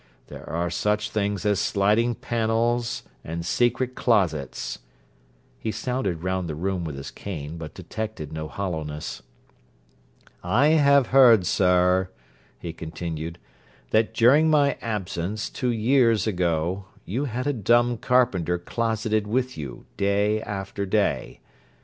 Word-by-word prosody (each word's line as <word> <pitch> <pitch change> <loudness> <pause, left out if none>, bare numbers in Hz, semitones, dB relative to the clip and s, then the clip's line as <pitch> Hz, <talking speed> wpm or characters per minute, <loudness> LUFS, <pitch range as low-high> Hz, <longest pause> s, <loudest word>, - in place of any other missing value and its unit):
There - - -10
are 85 +1 -1
such 105 +4 0
things 105 -1 -1
as 105 -2 +2
sliding 105 +5 +2
panels 115 +1 0 0.2
and 85 +1 -5
secret 120 +6 +1
closets.' 80 - 0 0.8
He 110 - -2
sounded 105 -10 -2
round 90 -2 -1
the 75 - -3
room 90 +2 -2
with 80 -4 -5
his 70 - -7
cane, 80 -5 -6
but 80 -2 -8
detected 110 -9 -6
no 80 0 -4
hollowness. 80 -5 -4 1.2
'I 120 +12 +3
have 140 -4 +5
heard, 120 -8 +7
sir,' 90 0 +3 0.5
he 85 -2 -6
continued, 80 0 -5 0.5
'that 110 0 +2
during 140 +7 +5
my 145 -2 +3
absence, 105 -1 -3
two 125 - -2
years 115 -2 +3
ago, 90 -1 -1 0.2
you 125 +10 -2
had 125 0 -3
a 145 - +1
dumb 120 +1 +3
carpenter 105 -10 +2
closeted 110 +2 -1
with 125 +3 -1
you 70 -5 -7
day 100 +2 +1
after 100 -1 -4
day. 100 +1 0
105 Hz, 125 wpm, -25 LUFS, 85-120 Hz, 1.2 s, heard